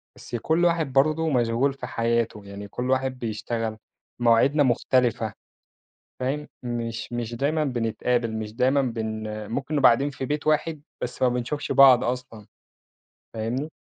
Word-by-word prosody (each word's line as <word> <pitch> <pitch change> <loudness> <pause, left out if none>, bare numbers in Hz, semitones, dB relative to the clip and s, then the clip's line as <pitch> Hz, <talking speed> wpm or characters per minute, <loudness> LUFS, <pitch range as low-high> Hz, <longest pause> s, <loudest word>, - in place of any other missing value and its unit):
بس - - -8
كل 160 +9 +1
واحد 165 -5 +1
برضه 155 +4 +3
مشغول 125 +1 +1
في 130 -2 -7
حياته، 115 -3 -1
يعني 100 +1 -8
كل 125 +4 -4
واحد 130 -1 0
بيشتغل، 115 0 -3 0.4
مواعيدنا 120 +5 +4
مختلفة 125 -2 +1 0.9
فاهم، 140 +4 -2 0.2
مش 120 -1 -4
مش 120 -1 -3
دايمًا 150 +5 0
بنتقابل 120 -2 -1
مش 110 -1 -5
دايمًا 130 +4 +3
بن 110 -3 -3
آآ، 105 0 -6
ممكن 135 +7 -3
نبقى 140 -3 +7
قاعدين 135 +5 +2
في 135 -1 -5
بيت 150 +3 -2
واحد 155 0 +1 0.2
بس 125 - -5
ما 130 - +5
بنشوفش 125 +4 -3
بعض 130 -3 +7
أصلًا، 120 -3 -4 0.9
فاهمني. 120 +7 -3
125 Hz, 145 wpm, -25 LUFS, 115-140 Hz, 0.9 s, نبقى